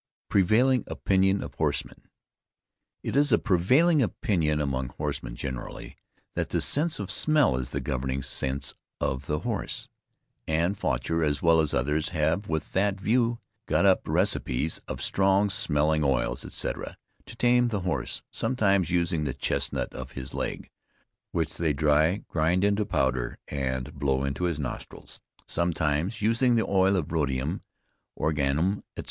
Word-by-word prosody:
PREVAILING 115 +6 +3
OPINION 95 0 +1
OF - - -8
HORSEMEN. - - -3 0.9
It - - -3
is 145 0 +3
a 110 - +6
prevailing 130 - +3
opinion 85 -9 0
among 65 -3 -1
horsemen 70 -5 -3
generally, 65 -1 -6 0.4
that - - -2
the - - 0
sense 155 +3 +1
of 100 -1 -3
smell 150 - +3
is 65 -1 -3
the - - -3
governing 65 0 -2
sense 65 +2 -2 0.3
of 65 +1 -2
the 75 0 -1
horse. - - -3 0.6
And 85 +5 +1
Faucher, 80 -4 -1
as 75 +1 0
well 85 -1 +5
as 75 -2 +1
others, 75 +6 0
have, 85 +4 0
with 80 -2 -2
that 100 0 +1
view, 120 +3 +2 0.3
got - - +2
up - - +3
receipts 70 +6 0
of - - -5
strong 100 +1 +2
smelling 75 -3 +2
oils, 65 -3 0
etc., - - -4 0.3
to - - -10
tame 120 0 +3
the 105 -4 -2
horse, 90 0 -3
sometimes 100 -8 +1
using 85 -3 +1
the 70 -2 -2
chesnut 70 - -1
of 65 0 -8
his 65 -1 -7
leg, - - -4 0.6
which 80 -3 -2
they 80 -3 +1
dry, 75 +6 +2
grind 85 +3 +1
into 100 0 +2
powder 65 - 0
and 65 -2 -3
blow 70 -1 0
into 70 +6 -1
his 85 -4 -1
nostrils. 70 -4 -7 0.2
Sometimes 85 +4 -1
using 115 +3 +3
the 115 - +2
oil 95 0 +3
of 85 -4 -2
rhodium, 70 -5 -1 0.6
organnnum, 80 +6 0
etc. - - -6
80 Hz, 150 wpm, -27 LUFS, 70-100 Hz, 0.9 s, a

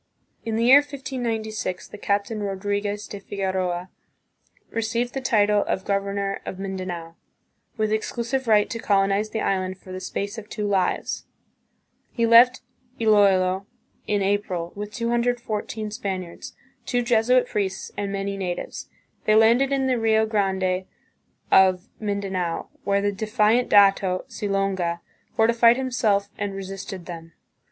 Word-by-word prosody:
In 225 -1 -2
the 230 - +1
year 265 +4 +9
1596, 240 -8 -4
the - - -10
Captain 205 +2 -1
Rodriguez 205 +1 -2
de 205 - -7
Figueroa 190 -2 -3 0.8
received 230 +2 -1
the 270 - -3
title 210 -4 +3
of 190 - -2
governor 200 0 -1
of 185 - -6
Mindanao, 185 -4 -5 0.6
with 215 -1 0
exclusive 235 +4 -2
right 210 -2 +4
to 230 - -3
colonize 200 0 +2
the 220 0 -3
island 185 -1 -1
for 185 - -13
"the 185 - -5
space 200 +3 -4
of 210 -1 -13
two 210 -2 -3
lives." 195 -3 0 0.9
He 235 - +1
left 240 +2 +6 0.4
Iloilo 195 -3 +3 0.4
in 205 -1 +1
April 190 -4 -1
with 205 +1 -6
214 235 -2 -2
Spaniards, 190 -6 -5 0.3
two 245 -1 +1
Jesuit 240 +1 +3
priests, 195 -2 -3
and 200 -1 -3
many 200 0 -3
natives. 180 -2 -5 0.4
They 215 - +4
landed 235 +5 +5
in 270 -1 +1
the 255 -2 +1
Rio 220 -1 +3
Grande 190 -3 0 0.7
of 190 +2 +4
Mindanao, 195 -5 -2 0.2
where 200 0 +1
the 205 - +2
defiant 215 +3 +1
dato, 195 -2 +4
Silonga, 195 -4 -1 0.3
fortified 230 +1 +5
himself 225 -6 +1
and 200 -1 -3
re 195 - -5
sisted 190 -1 -7
them. 165 -2 -9
205 Hz, 135 wpm, -24 LUFS, 190-225 Hz, 0.9 s, year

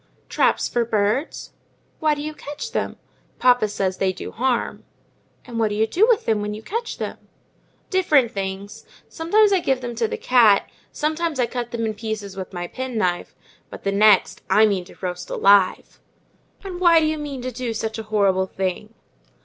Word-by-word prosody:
"Traps - - +2
for 240 - 0
birds." 220 +6 -1 0.5
"Why 305 -1 +2
do 290 - -6
you 305 +1 -4
catch 300 +10 -7
them?" - - -3 0.4
"Papa 245 -3 +4
says 195 -2 -2
they 190 -1 +1
do - - -8
harm." 245 0 -1 0.6
"And 235 -2 -5
what 225 - +3
do 205 - -3
you 220 +1 +2
do 370 - +3
with 475 -4 +2
them 220 -2 +1
when 210 0 -3
you 215 - -10
catch 460 - -4
them?" - - -5 0.7
"Different 305 - +3
things. 195 +1 -5 0.2
Sometimes 405 +6 +3
I 385 - +4
give 265 -6 0
them 240 -1 -5
to 230 -1 +1
the - - -4
cat; 230 -5 +4 0.2
sometimes 315 -1 -2
I 245 - +3
cut 240 0 -4
them 230 -1 -3
in 220 - -1
pieces 210 -2 -5
with 190 -1 -6
my 175 -2 -4
penknife; 215 -6 -3 0.3
but - - -10
the 195 - 0
next, 205 0 +4
I 220 - +6
mean 195 -4 0
to - - -15
roast 180 -1 -5
alive." 195 -2 +3 0.6
"And 370 -3 -6
why 340 -2 +6
do 315 - +1
you 310 0 -1
mean 280 -4 -6
to 255 - -3
do 245 0 -4
such 220 0 -3
a - - -4
horrible 195 -3 +2
thing?" 190 -1 -4
230 Hz, 190 wpm, -22 LUFS, 200-295 Hz, 0.7 s, I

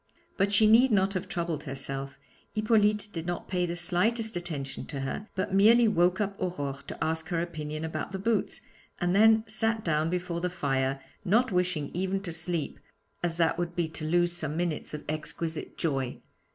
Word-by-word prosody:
But 200 +1 +1
she 205 +2 +5
need 230 +4 +6
not 195 -1 +3
have 185 0 -3
troubled 170 -5 -3
herself; 135 0 -4 0.4
Hippolyte 215 -1 +2
did 165 0 -5
not 175 0 -3
pay 180 -1 0
the 170 - -3
slightest 215 +6 +2
attention 155 -6 -4
to 140 -3 -5
her, 135 +10 -4
but 190 0 -2
merely 225 +4 +6
woke 180 -3 +3
up 200 -1 -1
Aurore 145 -6 -3
to - - -4
ask 160 0 -1
her 175 -2 -1
opinion 155 -2 -4
about 160 +2 -4
the 190 - -3
boots, 215 +1 -1 0.4
and 175 +1 +1
then 220 +1 +6
sat 225 0 +1
down 155 -1 +1
before 175 -1 -2
the 180 - 0
fire, 135 -5 -1 0.2
not 225 +5 +3
wishing 180 -5 0
even 190 +2 -1
to 180 - -5
sleep, 165 -1 -1 0.4
as 170 -1 -1
that 165 0 +2
would 175 0 -2
be 170 -2 0
to 160 - -6
lose 175 +2 +2
some 155 -3 -2
minutes 170 -3 -2
of 150 - -8
exquisite 155 +1 -4
joy. 135 -6 -1
175 Hz, 185 wpm, -28 LUFS, 155-195 Hz, 0.4 s, need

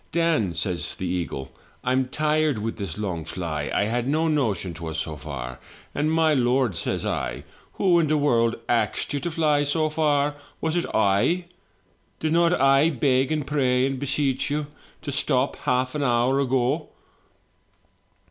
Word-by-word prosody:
" - - -39
'Dan,' 160 - +1
says 85 +2 -2
the 95 - -5
eagle, 85 -7 -3 0.3
'I'm 130 +1 +1
tired 155 0 +1
with 110 +2 -3
this 100 -4 -5
long 90 -6 -3
fly. 80 -3 -4
I - - +2
had 120 +3 -1
no 155 +3 +1
notion 115 - 0
'twas 80 -1 -6
so 80 -1 -3
far!' 65 -5 -7 0.2
" - - -25
'And 150 +2 0
my 160 -1 +3
lord, 125 - +2
sir,' 85 - -1
says - - -3
I, - - -2 0.3
'who 180 -3 +3
in 160 - +2
the 155 +1 +2
world 115 -6 +2
axed 115 +4 0
you 145 - 0
to 155 - -3
fiy 155 -3 +2
so 155 +2 +1
far 145 -2 +1
— - - -29
was 160 +1 -1
it 175 - 0
I? 100 - +2 0.7
Did 155 0 0
not 170 +1 +3
I 135 +3 +5
beg 135 -1 +1
and 155 -2 -1
pray 130 -3 +2
and 135 -1 -2
beseech 140 0 0
you 150 +1 -1 0.4
to 145 - -3
stop 135 -1 +1
half 130 +1 0
an 150 - -2
hour 125 +1 +2
ago?' 135 +3 0
135 Hz, 175 wpm, -24 LUFS, 105-150 Hz, 0.7 s, I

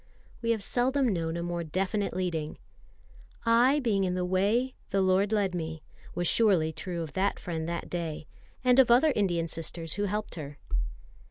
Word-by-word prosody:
We 230 - -2
have 225 -3 +1
seldom 260 +4 +1
known 165 -1 -2
a 170 - -3
more 175 0 -2
definite 190 +4 -1
leading. 165 -5 -2 0.9
"I 245 +5 +5
being 210 -6 +1
in 180 -1 0
the 180 0 0
way, 205 +8 +1 0.2
the 195 - +1
Lord 190 +2 +3
led 200 -4 +1
me," 160 -2 -4 0.3
was 175 0 0
surely 185 -8 +3
true 175 -1 -4
of 155 -3 -8
that 195 +2 +1
friend 165 -2 -4
that 170 0 -3
day, 165 -3 -4 0.4
and 250 0 +5
of 260 - +6
other 265 +5 +5
Indian 175 -5 +1
sisters 165 0 -5
who 205 - -1
helped 210 +2 -3
her. 145 -3 -7
185 Hz, 175 wpm, -29 LUFS, 165-220 Hz, 0.9 s, of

